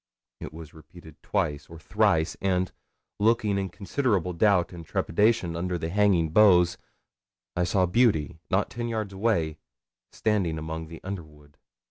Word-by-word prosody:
It -, -, -7 dB
was 80 Hz, -1 st, -11 dB
repeated 80 Hz, 0 st, -15 dB
twice 75 Hz, -1 st, -2 dB
or 80 Hz, -, -10 dB
thrice, 80 Hz, 0 st, +1 dB
and, 95 Hz, -3 st, 0 dB, 0.5 s
looking 105 Hz, -2 st, +2 dB
in 95 Hz, -1 st, -3 dB
considerable 100 Hz, -, -1 dB
doubt 90 Hz, 0 st, +2 dB
and 85 Hz, -1 st, -8 dB
trepidation 100 Hz, +2 st, +1 dB
under 90 Hz, +1 st, -2 dB
the 80 Hz, 0 st, -4 dB
hanging 95 Hz, -4 st, +2 dB
boughs, 90 Hz, -2 st, +5 dB, 0.8 s
I 90 Hz, 0 st, +1 dB
saw 95 Hz, +1 st, +2 dB
Beauty, 90 Hz, -, +1 dB
not 95 Hz, +2 st, 0 dB
ten 120 Hz, 0 st, -4 dB
yards 110 Hz, -4 st, -3 dB
away, 95 Hz, -7 st, 0 dB, 0.5 s
standing 95 Hz, -7 st, 0 dB
among 80 Hz, +1 st, -5 dB
the 80 Hz, 0 st, -11 dB
underwood. 75 Hz, -6 st, -9 dB
90 Hz, 140 wpm, -26 LUFS, 80-105 Hz, 0.8 s, boughs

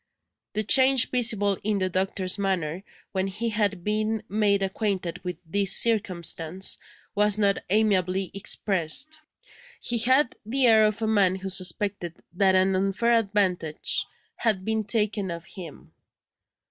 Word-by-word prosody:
The 215 Hz, -, -1 dB
change 260 Hz, +3 st, +4 dB
visible 215 Hz, -5 st, +2 dB
in 210 Hz, 0 st, 0 dB
the 185 Hz, -1 st, 0 dB
doctor's 185 Hz, +1 st, -2 dB
manner, 185 Hz, -4 st, -2 dB, 0.3 s
when 190 Hz, 0 st, -1 dB
he 215 Hz, +5 st, -3 dB
had 205 Hz, -4 st, -1 dB
been 215 Hz, +1 st, -1 dB
made 205 Hz, -1 st, +1 dB
acquainted 190 Hz, -3 st, -3 dB
with 180 Hz, -2 st, -5 dB
this 195 Hz, +3 st, +1 dB
circumstance, 185 Hz, -5 st, 0 dB, 0.3 s
was 210 Hz, -1 st, +2 dB
not 200 Hz, -2 st, +2 dB
amiably 190 Hz, -3 st, +1 dB
expressed; 200 Hz, -, -1 dB, 0.6 s
he 235 Hz, -1 st, -2 dB
had 260 Hz, +3 st, +2 dB
the 255 Hz, +5 st, +1 dB
air 220 Hz, -2 st, +6 dB
of 215 Hz, +1 st, -1 dB
a -, -, 0 dB
man 200 Hz, -4 st, +3 dB
who 190 Hz, 0 st, -6 dB
suspected 185 Hz, -1 st, -2 dB, 0.2 s
that 190 Hz, +1 st, +3 dB
an 190 Hz, +1 st, +3 dB
unfair 195 Hz, +5 st, +1 dB
advantage 195 Hz, -8 st, 0 dB, 0.3 s
had 210 Hz, -5 st, 0 dB
been 220 Hz, -1 st, -1 dB
taken 210 Hz, -2 st, -1 dB
of 170 Hz, 0 st, -6 dB
him. 180 Hz, -6 st, -11 dB
200 Hz, 135 wpm, -25 LUFS, 185-215 Hz, 0.6 s, air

